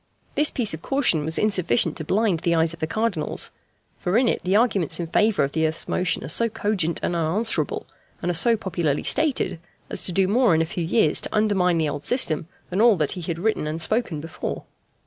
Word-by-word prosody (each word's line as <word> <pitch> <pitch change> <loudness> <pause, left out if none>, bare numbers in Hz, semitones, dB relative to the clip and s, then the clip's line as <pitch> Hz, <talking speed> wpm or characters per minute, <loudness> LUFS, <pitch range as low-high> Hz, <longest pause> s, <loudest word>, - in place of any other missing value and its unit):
This 300 0 +4
piece 230 -8 -1
of 160 - -6
caution 250 - +1
was 160 +2 -2
insufficient 185 - +2
to - - -5
blind 195 +1 +1
the 170 +1 +1
eyes 160 0 +2
of 170 - -11
the 160 - -2
Cardinals; 215 -5 -1 0.5
for 180 +5 0
in 250 0 +3
it - - 0
the 185 +2 +1
arguments 205 - +2
in 170 - -2
favour 210 +2 +2
of 140 - -1
the 160 +1 +1
earth's 160 +1 -4
motion 180 0 0
are - - -6
so 230 +10 +2
cogent 200 -6 -1
and 175 - -1
unanswerable, 170 +8 -1 0.3
and 175 - -1
are - - -2
so 230 +7 +3
popularly 170 -7 -2
stated, 265 - 0 0.3
as - - -2
to - - -2
do 190 +2 +2
more 220 -3 +3
in 160 - +2
a - - -2
few 175 +1 -4
years 165 -2 +2
to - - -5
undermine 195 -5 +2
the 160 -1 +1
old 145 0 -4
system 165 - +2 0.2
than 190 +4 0
all 230 -2 +6
that 155 -5 -1
he 180 - -4
had 170 -1 -4
written 195 -4 -1
and 155 +2 -3
spoken 195 -2 0
before. 160 +2 -6
180 Hz, 225 wpm, -23 LUFS, 160-215 Hz, 0.5 s, all